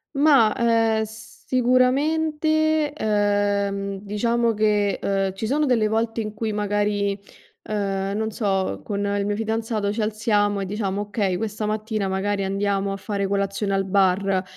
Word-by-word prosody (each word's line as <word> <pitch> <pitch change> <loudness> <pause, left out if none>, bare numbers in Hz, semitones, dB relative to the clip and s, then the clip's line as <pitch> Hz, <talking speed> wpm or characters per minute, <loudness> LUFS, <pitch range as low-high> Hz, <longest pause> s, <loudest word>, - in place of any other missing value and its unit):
Mah, 275 -7 +5
uhm, 225 -1 +2
sicuramente, 300 +7 +1
uhm, 205 -1 0
diciamo 230 +3 0
che, 210 -2 +1
uhm, 195 -1 0
ci 205 +3 -4
sono 295 +5 +1
delle 235 -5 +2
volte 225 +1 -1
in 215 -1 -3
cui 220 0 -3
magari, 205 -1 0 0.5
uhm, 195 -1 -1
non 220 0 -1
so, 195 -3 -1
con 205 -4 -2
il 200 0 0
mio 205 0 -1
fidanzato 220 -2 -1
ci 225 - -2
alziamo 210 -1 +1
e 195 - -2
diciamo: 200 0 -2
"Okay, 205 -3 -1
questa 215 +1 -3
mattina 215 -1 -2
magari 195 +1 -1
andiamo 195 0 -1
a 195 - -3
fare 200 0 -3
colazione 200 +1 -1
al 195 0 +1
bar". 190 0 +2
210 Hz, 145 wpm, -23 LUFS, 200-225 Hz, 0.5 s, Mah